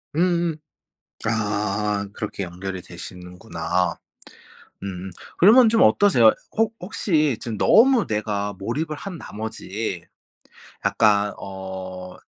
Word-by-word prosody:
음음. 170 -1 +1 0.7
아 105 -1 -1
그렇게 105 -2 -4
연결이 90 +1 -6
되시는구나. 90 0 -4 0.9
음 95 -1 -6 0.3
그러면 225 +6 +7
좀 225 0 +4
어떠세요? 120 - +6 0.2
혹 225 0 +1
혹시 155 - 0
지금 115 -4 -4
너무 240 - +5
내가 105 -1 -2
몰입을 150 +10 -3
한 185 -4 -7
나머지 105 -4 -5 0.8
약간 105 -2 +3
어 95 -1 -7
105 Hz, 205 characters per minute, -23 LUFS, 95-155 Hz, 0.9 s, 그러면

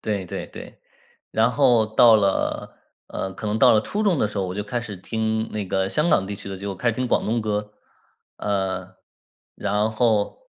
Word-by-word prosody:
对 100 -3 -2
对 - - -6
对， - - -11 0.5
然 115 +2 +2
后 125 -5 +4
到 120 -4 +7
了 100 -2 -1 0.3
呃， 95 - -4
可 105 - -6
能 105 +1 -1
到 - - +6
了 105 - +4
初 205 - -2
中 190 -8 +2
的 105 - +1
时 105 - -5
候， 95 - -1
我 90 - -5
就 105 - -2
开 120 +4 -3
始 105 -5 -7
听 110 +3 -2
那 105 -2 -2
个 95 +1 0
香 150 +10 +1
港 95 - +3
地 100 - -4
区 100 - -8
的， 95 - -5
就 100 0 -5
开 120 +6 -1
始 - - +2
听 125 +1 -1
广 - - +1
东 115 +2 0
歌。 105 -1 -3 0.7
呃， 95 -2 -2 0.6
然 105 +2 0
后 110 - 0
105 Hz, 225 characters per minute, -23 LUFS, 100-115 Hz, 0.7 s, 到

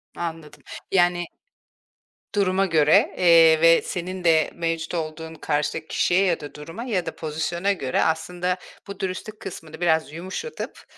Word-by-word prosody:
Anladım, 160 -4 -6 0.3
yani 175 -1 +3 1.1
Duruma 195 -1 +2
göre, 155 -4 +4
eee, 165 -2 +6
ve 165 0 +6
senin 180 +1 -5
de 160 -2 +3
mevcut 165 0 -2
olduğun 160 0 -4
karşıdaki 150 +1 -2
kişiye 185 +3 +2
ya 175 -3 +1
da 145 -2 -9
duruma 165 +9 -8
ya 200 -9 -1
da 165 - -5
pozisyona 160 +5 -2
göre, 135 -8 -1
aslında 180 +3 -1 0.3
bu 200 0 -8
dürüstlük 195 +3 -5
kısmını 165 -3 -9
biraz 160 -3 +2
yumuşatıp, 190 - -6
170 Hz, 135 wpm, -24 LUFS, 160-185 Hz, 1.1 s, eee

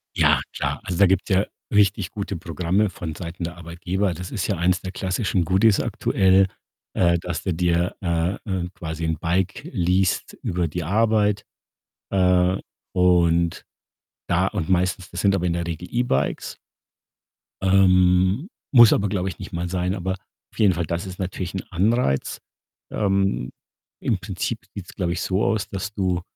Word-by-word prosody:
Ja, - - +4
klar. - - -2
Also, 90 - -3
da 100 - +8
gibt's 95 0 +1
ja 95 +1 +3 0.3
richtig 100 -2 +3
gute 100 -3 -4
Programme 90 +5 0
vonseiten 85 0 -6
der 85 +1 -5
Arbeitgeber. 90 +3 -2
Das 90 +2 -7
ist 100 -5 -2
ja 100 - 0
eins 90 +2 +1
der 95 - -5
klassischen 95 0 -1
Goodies 95 +4 +4
aktuell, 95 0 +3 0.5
äh, 85 -1 +3
dass 85 0 -4
du 95 - -1
dir, 85 +1 +1
äh, 85 0 0
äh, 90 -2 -2
quasi 80 -3 -5
'n 80 -1 -1
Bike 90 +2 -1
least 90 -1 +1
über 85 -1 0
die 85 +3 -4
Arbeit, 105 +2 +2 0.7
äh, 90 -1 +3 0.4
und 85 -2 +3 0.6
da 90 +2 +2
und 95 -7 -3
meistens 90 0 0
das 90 - -4
sind 100 -1 +3
aber 90 -2 0
in 85 - +1
der 85 -1 -2
Regel 85 +1 -5
E-Bikes. 120 - -1 1.0
Ähm, 95 - +4 0.2
muss 120 -5 +8
aber, 100 0 +1
glaube 95 -1 -1
ich, 85 - -9
nicht - - -8
mal 85 +1 -2
sein, 90 +1 -1
aber 95 +1 -2 0.4
auf - - -16
jeden 100 -4 +5
Fall, 85 0 -2
das 85 +3 -3
ist 95 -1 -8
natürlich 90 -1 -4
'n 95 - -3
Anreiz. 95 - +1 0.5
Ähm, 95 - 0 0.5
im - - 0
Prinzip - - -3 0.2
sieht's, 95 -3 -8
glaube 90 -3 -1
ich, - - -3
so 95 +2 0
aus, 110 -2 0
dass 100 +2 -5
du, 90 -3 0
90 Hz, 165 wpm, -23 LUFS, 85-95 Hz, 1.0 s, da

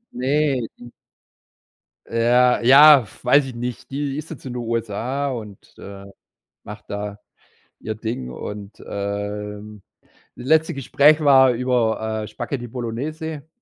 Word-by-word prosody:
Ne, 135 -2 0
die 120 0 -13 1.1
Ja, 120 +2 +3
ja, 135 0 +8 0.2
weiß 140 +3 +4
ich 130 - -8
nicht, 120 0 -6
die 140 0 -3
ist 155 +1 -7
jetzt 155 -4 -10
in 130 - -5
den 125 - -4
USA 115 +5 -2
und, 105 -5 -7 0.2
äh, 100 0 -10 0.6
macht 105 +1 -10
da 100 0 -5 0.6
ihr 110 - -4
Ding 110 - -5
und, 100 - -8
ähm, 105 +1 -5 0.5
das 125 - -10
letzte 160 +1 +3
Gespräch 140 +3 +3
war 130 -2 +6
über, 110 -3 -1
äh, - - -6
Spaghetti 120 +1 -5
Bolognese. 140 +6 -5
120 Hz, 130 wpm, -21 LUFS, 105-135 Hz, 1.1 s, ja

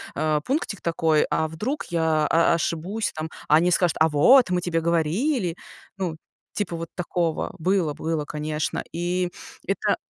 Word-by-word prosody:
а, 155 0 +1
пунктик 255 - -2
такой, 160 -2 +2
а 160 - +1
вдруг 210 - -3
я 160 -2 +1
о 165 +1 +4
ошибусь, 170 +6 -2
там, 155 +1 -4 0.2
а 150 - +5
они 175 +3 +4
скажут: 175 -2 +2
"А 160 - +5
вот, 235 - +6
мы 180 -1 +1
тебе 170 -2 -1
говорили!" 170 - 0 0.4
Ну, 175 -5 -3 0.4
типа 205 -5 -2
вот 165 0 -6
такого. 170 -2 -2
Было, 175 -2 +1
было, 160 0 -2
конечно. 150 +1 -3
И 175 +1 -1 0.4
это - - 0
165 Hz, 155 wpm, -24 LUFS, 155-180 Hz, 0.4 s, вот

